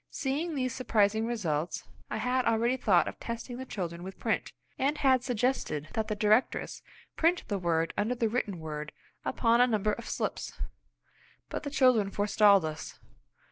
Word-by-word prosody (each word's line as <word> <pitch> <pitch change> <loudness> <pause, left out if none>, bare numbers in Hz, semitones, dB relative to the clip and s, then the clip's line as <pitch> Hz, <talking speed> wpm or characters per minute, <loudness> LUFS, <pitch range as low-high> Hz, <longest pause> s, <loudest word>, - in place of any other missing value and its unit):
Seeing 300 +5 -2
these 255 -3 -1
surprising 220 -3 +2
results, 175 -9 -2 0.3
I - - -2
had 250 +3 +1
already 230 +2 +2
thought 200 -8 +3
of - - -6
testing 235 +1 -5
the 260 +1 -7
children 175 -6 -4
with 190 +1 -8
print, - - -1 0.3
and 285 +3 +1
had 260 -3 +3
suggested 245 - -1
that 220 -1 -1
the 215 - -1
directress 215 +4 +1 0.3
print 335 +2 +2
the 200 -2 -1
word 165 -2 0
under 225 +5 0
the 235 -2 +1
written 215 -4 -1
word 150 -1 -6 0.3
upon 235 0 +3
a 250 - +6
number 215 -2 +1
of 235 - -6
slips. - - -3 1.0
But - - -3
the 285 - -4
children 255 -8 +4
forestalled 205 -2 +4
us! 155 0 -6
220 Hz, 165 wpm, -30 LUFS, 195-255 Hz, 1.0 s, a